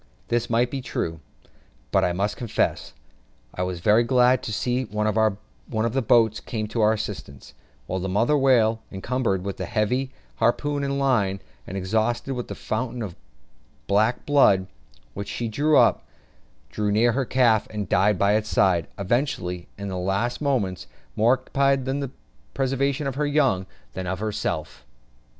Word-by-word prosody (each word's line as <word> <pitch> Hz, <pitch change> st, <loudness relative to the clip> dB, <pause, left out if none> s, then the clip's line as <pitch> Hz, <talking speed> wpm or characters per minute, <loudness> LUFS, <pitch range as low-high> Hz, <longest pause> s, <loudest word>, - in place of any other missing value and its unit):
This 120 Hz, 0 st, 0 dB
might 120 Hz, +1 st, +2 dB
be 140 Hz, -, -2 dB
very -, -, -10 dB
true; 80 Hz, -1 st, -2 dB, 0.7 s
but -, -, +3 dB
I 90 Hz, -, +2 dB
must 100 Hz, +4 st, -1 dB
confess 120 Hz, -3 st, -1 dB, 0.6 s
I -, -, -4 dB
was 90 Hz, -2 st, -3 dB
very 105 Hz, +5 st, +5 dB
glad 125 Hz, +1 st, +4 dB
to -, -, -5 dB
see 125 Hz, +4 st, -1 dB
one 105 Hz, 0 st, -2 dB
of 110 Hz, -, -1 dB
the 135 Hz, -, +1 dB
boats 115 Hz, -2 st, +3 dB
come 110 Hz, -2 st, -4 dB
to 115 Hz, -, -1 dB
our 110 Hz, +1 st, +5 dB
assistance, 100 Hz, -, -6 dB, 0.3 s
while 95 Hz, -, -3 dB
the 95 Hz, +1 st, -3 dB
mother 115 Hz, +10 st, +2 dB
whale, 120 Hz, -5 st, +3 dB
encumbered 100 Hz, -1 st, -1 dB
with 100 Hz, 0 st, -4 dB
the -, -, -4 dB
heavy 125 Hz, +5 st, 0 dB, 0.3 s
harpoon 140 Hz, +5 st, +1 dB
and 140 Hz, 0 st, -1 dB
line, 110 Hz, -9 st, +1 dB, 0.3 s
and 95 Hz, -, -5 dB
exhausted 110 Hz, +7 st, -1 dB
with 125 Hz, -2 st, -4 dB
the -, -, -6 dB
fountain 120 Hz, +1 st, -3 dB
of 90 Hz, -5 st, -6 dB, 0.7 s
black 110 Hz, +4 st, +1 dB
blood 135 Hz, -10 st, +4 dB, 0.5 s
which 100 Hz, 0 st, -6 dB
she 120 Hz, -, -3 dB
threw 145 Hz, +7 st, +2 dB
up, -, -, +4 dB, 0.7 s
drew 105 Hz, +6 st, -1 dB
near 115 Hz, +3 st, +4 dB
to -, -, -4 dB
her 135 Hz, -, +1 dB
calf, 120 Hz, -4 st, +3 dB
and 105 Hz, -3 st, -4 dB
died 105 Hz, +2 st, +3 dB
by 100 Hz, +3 st, +3 dB
its 110 Hz, 0 st, 0 dB
side; 85 Hz, -4 st, +2 dB
evidently, 100 Hz, -5 st, -1 dB
in 100 Hz, -1 st, -5 dB
her 95 Hz, -, -4 dB
last 100 Hz, +8 st, -1 dB
moments, 115 Hz, -, -1 dB, 0.3 s
more 115 Hz, +4 st, +4 dB
occupied 135 Hz, +1 st, +1 dB
with 135 Hz, +1 st, -1 dB
the 135 Hz, -2 st, -4 dB, 0.4 s
preservation 135 Hz, +2 st, 0 dB
of 135 Hz, -, -1 dB
her 145 Hz, +2 st, -1 dB
young 135 Hz, -11 st, +2 dB, 0.3 s
than 95 Hz, -1 st, -5 dB
of 95 Hz, +1 st, -2 dB
herself. 100 Hz, -, -3 dB
110 Hz, 170 wpm, -24 LUFS, 100-130 Hz, 0.7 s, very